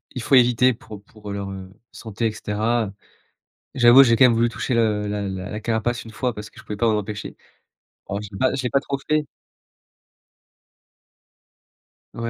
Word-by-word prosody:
il 125 - -3
faut 135 - +2
éviter 125 0 +4
pour 105 -3 -12
pour 105 -1 -12
leur, 100 -1 -4
heu, 95 -1 -8 0.2
santé 110 0 -4
et 110 - -2
cetera. 110 0 -2 0.8
J'avoue, 125 +2 +7
j'ai 115 -3 +4
quand 120 - +4
même 125 - +5
voulu 115 +1 +2
toucher 120 +2 -3
le 110 -3 +1
la 105 0 -3
la 95 0 -5
la 105 - -4
carapace 115 +2 -2
1 110 - -10
fois 125 +2 -2
parce 105 0 -8
que - - -25
je - - -13
pouvais 105 - -6
pas 115 +2 +1
m'en 110 - +2
empêcher. 105 0 -7 0.7
Alors 100 +1 -3
je 105 - -8
l'ai 95 - -9
pas 130 0 +1
je 135 - -2
l'ai 125 - -2
pas 140 - +3
trop 140 0 -4
fait 155 -1 +2 2.9
Ouais, 115 - -7
110 Hz, 195 wpm, -22 LUFS, 105-120 Hz, 2.9 s, J'avoue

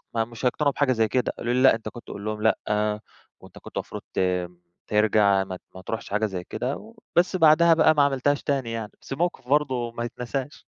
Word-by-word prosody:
ما 115 - +2
مش 115 +2 -10
هيقتنعوا 140 +3 +2
بحاجة 135 -2 +2
زي 110 -2 +2
كده. 125 +4 0
قالوا 120 - -1
لي: 130 - +2
"لأ، 135 - +7
أنت 110 -1 -5
كنت 120 +2 -11
تقول 100 - -8
لهم 110 0 -3
لأ، 110 - +4 0.8
وأنت - - -14
كنت - - -7
مفروض - - -6
ت - - 0 0.7
ترجع، 105 -2 +3
ما 95 -1 -7 0.2
ما 95 - -10
ترُحش 110 +4 -5
حاجة 105 +2 +1
زي 95 -3 -5
كده." 125 +8 -3 0.4
وبس 180 +2 +3
بعدها 165 0 +6
بقى 160 -1 +5
ما 145 - +4
عملتهاش 140 +1 +1
تاني 135 -5 -1
يعني، 110 -2 -5
بس - - -9
الموقف 160 -3 -2
برضه 130 -5 +1
ما 120 0 -4
يتناسش. 125 +3 -4
120 Hz, 205 wpm, -25 LUFS, 110-140 Hz, 0.8 s, لأ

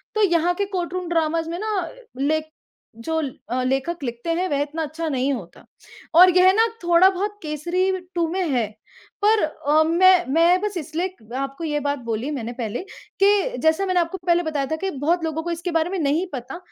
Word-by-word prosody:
तो 435 - +2
यहाँ 345 -1 +3
के 400 - -1
कोर्टरूम 365 -2 -3
ड्रामाज़ 330 -1 0
में 340 - -3
ना 410 -5 -2 0.3
ले 305 +3 +1 0.5
जो 320 +8 -2 0.3
अ, 255 +1 -1
लेखक 270 +6 -1
लिखते 240 +5 -5
हैं 360 +3 0
वह 285 -1 0
इतना 305 +3 -3
अच्छा 320 +2 -4
नहीं 270 0 0
होता, 190 -9 -8 0.5
और 365 +2 +9
यह 370 +1 +7
ना 450 +3 +4 0.2
थोड़ा 345 +2 +6
बहुत 405 +2 -3
केसरी 345 +5 -1 0.2
टू 340 -1 +1
में 375 - -1
है। 240 -5 +1 0.6
पर 435 -2 +4
अ, 305 0 +2
मैं 355 +2 +5
मैं 345 +3 +4
बस 415 -3 -2
इसलिए 340 +4 -3 0.2
आपको 275 +3 -4
ये 295 -2 -1
बात 285 -1 -2
बोली 230 +6 -2
मैंने 240 -5 -4
पहले 215 -2 -3 0.4
कि 410 +5 +3
जैसा 320 +5 +2
मैंने 370 -2 +2
आपको 340 +3 -1
पहले 345 0 +3
बताया 300 -3 -1
था - - +2
कि 385 +4 -3
बहुत 325 +4 0
लोगों 320 0 -2
को 345 - -3
इसके 340 +1 -3
बारे 325 0 +1
में 380 -1 -2
नहीं 305 +4 +1
पता 250 +4 -6
330 Hz, 195 wpm, -22 LUFS, 290-365 Hz, 0.6 s, और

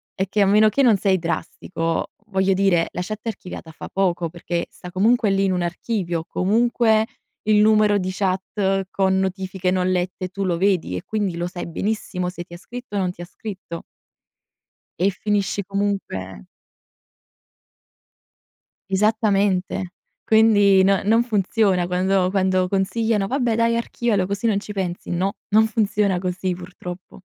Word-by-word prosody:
È 190 - 0
che 210 - -1
a - - +6
meno 210 +2 +5
che 275 +6 +1
non 235 -4 +6
sei 190 -1 +2
drastico, 165 0 -3 0.2
voglio 190 -2 +2
dire 185 -3 +2
la - - -3
chat 215 +3 -6
archiviata 180 -6 -6
fa - - -9
poco 180 -3 0
perché, 170 +1 -3
sta 180 - -10
comunque 220 +4 +3
lì 195 0 +2
in 190 - +1
un 180 -1 0
archivio, 175 -1 -2
comunque 220 +2 +2 0.4
il 215 -1 +5
numero 215 -1 +4
di 185 - -2
chat 195 0 -1
con 190 -1 +2
notifiche 190 -1 -2
non 185 0 +1
lette 185 0 -2
tu 195 +1 -3
lo 175 -2 0
vedi 185 - +1
e - - -6
quindi 205 -5 -2
lo 175 - -2
sai 175 -1 -6
benissimo 180 0 -2
se 175 -1 -7
ti 170 - -15
ha - - -9
scritto 245 +3 -9
o 200 - +1
non 180 -1 0
ti 175 - -12
ha - - -6
scritto. 185 -3 -8 1.2
E 190 +2 +3
finisci 200 0 -1
comunque 195 - -3 2.4
Esattamente. 195 -3 +1 0.3
Quindi 205 -3 +5
no 195 0 +3
non 225 +3 +4
funziona 200 -4 +1
quando 185 +1 +1
quando 185 -1 +1
consigliano: 205 +2 0
"Vabbè, 245 -1 0
dai, 230 0 +2
archivialo, 230 -4 0
così 200 +4 -2
non 205 -3 +2
ci 210 - -8
pensi." 185 -3 -4
No, 190 +4 -1
non 220 +2 +5
funziona 210 -3 +1
così, 185 0 -2
purtroppo. 180 +1 -9
195 Hz, 155 wpm, -22 LUFS, 180-210 Hz, 2.4 s, a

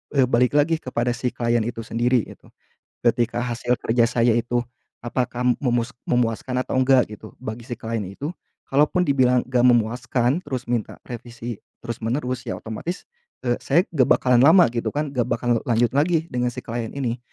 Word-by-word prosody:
eee, 135 - +5
balik 125 +3 +2
lagi 155 +2 +3
kepada 125 -3 -1
si 125 +1 -2
klien 120 0 +1
itu 115 -1 -4
sendiri 120 +1 +1
gitu. - - -16 0.6
Ketika 120 0 +1
hasil 120 0 -1
kerja 115 +1 +2
saya 120 -2 +3
itu 120 +1 0 0.4
apakah 125 0 -1 0.2
memus 120 -1 +1 0.2
memuaskan 125 +1 0
atau - - -4
enggak 130 -1 +4
gitu 110 +1 -12
bagi 115 -1 -6
si 120 - -4
klien 115 -1 -3
itu, 135 - -5 0.4
kalaupun 150 +6 +3
dibilang 125 -3 +3
enggak 125 -1 +2
memuaskan 120 +3 +2
terus 130 -3 -4
minta 120 -3 -2
revisi 120 -1 -7 0.3
terus 115 -1 -5
menerus, 125 +2 -2
ya - - -3
otomatis, 140 - -6 0.4
eee, 120 0 +2
saya 160 +6 +4
enggak 130 -5 +3
bakalan 125 -2 +4
lama 170 +4 +7
gitu 120 -1 -2
kan, 150 0 -1
enggak 120 - +2
bakalan 120 -2 +1
lanjut 120 0 +3
lagi 160 +2 +2
dengan 125 0 0
si - - -5
klien 115 -1 -4
ini. 125 -4 -3
120 Hz, 175 wpm, -23 LUFS, 120-130 Hz, 0.6 s, lama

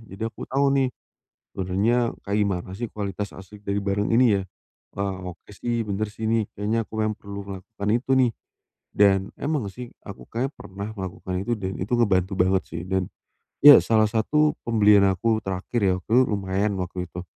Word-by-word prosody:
Jadi 100 - -14
aku - - -9
tahu 140 +2 +1
nih, 130 - +2 0.6
sebenernya 95 +6 +1 0.3
kayak 100 +1 -1
gimana 95 -4 -1
sih, 115 +5 -4
kualitas 100 -2 -5
asli 95 +2 -12
dari 100 0 -2
barang 100 +1 0
ini, 120 +3 +4
ya. - - -3 0.5
Wah, 95 -3 -4
oke 85 - -19
sih, 115 +3 -2
bener 105 0 -2
sih 105 +2 -9
nih. 110 -1 +1
Kayaknya 110 +2 -1
aku - - -22
mem 110 - +1
perlu 100 0 -7
melakukan 100 +2 -7
itu, 120 +4 0
nih. 125 -3 +4 0.6
Dan 100 -1 +5 0.2
emang 140 -9 -2
sih, 125 +3 -8 0.2
aku 100 - -10
kayaknya 130 +5 -2
pernah 100 -4 -8
melakukan 95 -2 -5
itu, 105 +5 -2
dan 95 -2 -5
itu 110 +6 0
ngebantu 95 -4 +2
banget, 95 0 +3
sih. 85 +1 -5
Dan, 95 -1 -1 0.5
iya, 145 0 +11
salah 110 -1 +2
satu 150 +8 +2
pembelian 105 -3 +5
aku 110 +4 +1
terakhir 95 +3 -3
ya, 95 - +3
itu 110 +7 +1
lumayan 100 0 -1
waktu 90 0 -5
itu. 90 +1 -7
100 Hz, 180 wpm, -24 LUFS, 95-115 Hz, 0.6 s, iya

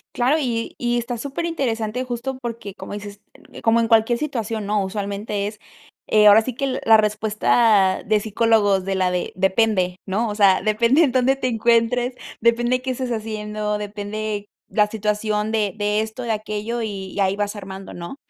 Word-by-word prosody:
Claro, 255 +6 +2
y 235 -5 -2
y 240 0 0
está 240 0 -3
super 280 +7 -4
interesante 250 -7 -2
justo 255 +1 -4
porque, 230 -4 -6
como 205 - -9
dices, 205 0 -8 0.4
como 230 +1 +4
en 230 - +1
cualquier 225 +1 +3
situación, 230 -7 -3
¿no? 205 0 0
Usualmente 200 +1 -3
es, 210 0 -8 0.5
eh, 210 -1 +5
ahora 210 +2 +8
sí 245 +1 -5
que 270 -1 -2
la 225 -1 +7
respuesta 215 -1 +2
de 215 +1 +2
psicólogos 210 -2 +2
de 195 - -1
la 185 -1 +1
de, 180 - -2
depende, 190 -1 +1
¿no? 215 +4 0
O 205 - -4
sea, 195 -3 +4
depende 235 +8 +3
en 270 - +2
dónde 260 +1 +3
te 260 -1 -2
encuentres, 235 +2 +2 0.3
depende 240 +2 +2
qué 260 0 -2
estés 255 -1 -3
haciendo, 210 -1 -3
depende 210 0 -4 0.2
la 210 -1 +3
situación 210 0 -1
de 210 -3 0
de 210 0 +1
esto, 220 +3 -5
de 230 - -2
aquello, 215 +2 -3
y 195 -3 -5
y - - -6
ahí 195 0 +2
vas 205 +1 -2
armando, 190 -1 -8
¿no? 170 +8 -7
215 Hz, 180 wpm, -22 LUFS, 205-235 Hz, 0.5 s, ahora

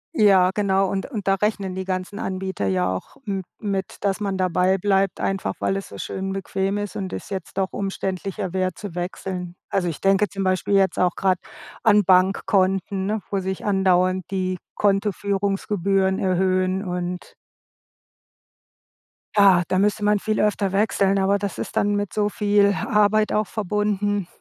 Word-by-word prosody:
Ja, 195 -6 +5
genau, 195 -2 +2
und 195 0 -2
und 215 -8 -6
da 195 - +4
rechnen 195 -2 -1
die 190 0 -4
ganzen 185 +1 -3
Anbieter 190 - -3
ja 95 -1 +1
auch 90 - -8
m 195 -2 -2 0.2
mit, 195 -2 -3
dass 195 0 0
man 200 -2 -2
dabei 185 +1 +2
bleibt, 195 0 +1
einfach 195 0 -1
weil 195 - 0
es 195 - -7
so 100 - -10
schön 190 - -4
bequem 195 +1 -2
ist 205 -1 -5
und 190 -2 -3
das - - -7
jetzt 190 -2 -6
doch 190 - -1
umständlicher 195 0 -3
wäre 185 -1 0
zu 200 -3 -8
wechseln. 180 0 -5
Also 190 -3 0
ich 165 - -4
denke 195 +1 +3
zum 195 0 -4
Beispiel 185 +1 0
jetzt 195 -2 +3
auch 180 -1 +2
gerade 185 -2 +1 0.4
an 210 -2 +5
Bankkonten, 190 +1 +2
ne, 210 +1 -1
wo 200 - 0
sich 190 0 -4
andauernd 185 -2 +2
die 185 -1 -1 0.2
Kontoführungsgebühren 195 -1 0
erhöhen 185 0 +1
und 180 -1 -4 2.0
Ja, 195 -3 +7
da 185 - 0
müsste 205 +2 +1
man 210 0 +3
viel 215 +1 -1
öfter 205 -2 +1
wechseln, 195 -1 +2
aber 195 +1 +2
das 200 -1 -4
ist - - -5
dann 205 0 +2
mit 205 -1 -2
so 210 -1 +1
viel 205 -1 +3 0.2
Arbeit 215 0 +3
auch 215 0 +1
verbunden. 205 -2 -1
195 Hz, 165 wpm, -23 LUFS, 185-205 Hz, 2.0 s, Ja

